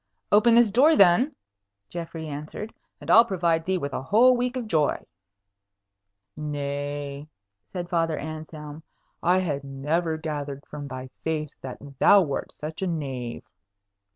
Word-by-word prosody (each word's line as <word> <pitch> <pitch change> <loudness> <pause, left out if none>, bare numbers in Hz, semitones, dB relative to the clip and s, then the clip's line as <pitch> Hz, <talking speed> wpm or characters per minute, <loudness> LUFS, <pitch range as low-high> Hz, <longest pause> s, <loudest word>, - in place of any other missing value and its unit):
"Open 230 +3 +6
this 235 -3 +5
door 285 +9 +5
then," 200 - +5 0.5
Geoffrey 165 -2 -6
answered, 150 +9 -6 0.3
"and - - -3
I'll 230 - +9
provide 170 -6 0
thee 190 0 +1
with 140 -5 -4
a - - -2
whole 235 - +5
week 250 +1 -1
of 245 - -3
joy." 155 -7 +1 1.3
"Nay," 145 -1 -4 0.4
said 175 -2 -4
Father 165 -3 0
Anselm, 155 -1 -7 0.4
"I 180 +2 +3
had 145 -6 -2
never 155 +4 -1
gathered 145 -3 -5
from 145 -1 -7
thy 130 -1 -7
face 155 -2 -2
that 130 -1 -7 0.2
thou 200 -1 +7
wert 140 -4 -3
such 155 +3 -7
a 190 - 0
knave." 135 -8 -4
160 Hz, 140 wpm, -25 LUFS, 145-185 Hz, 1.3 s, I'll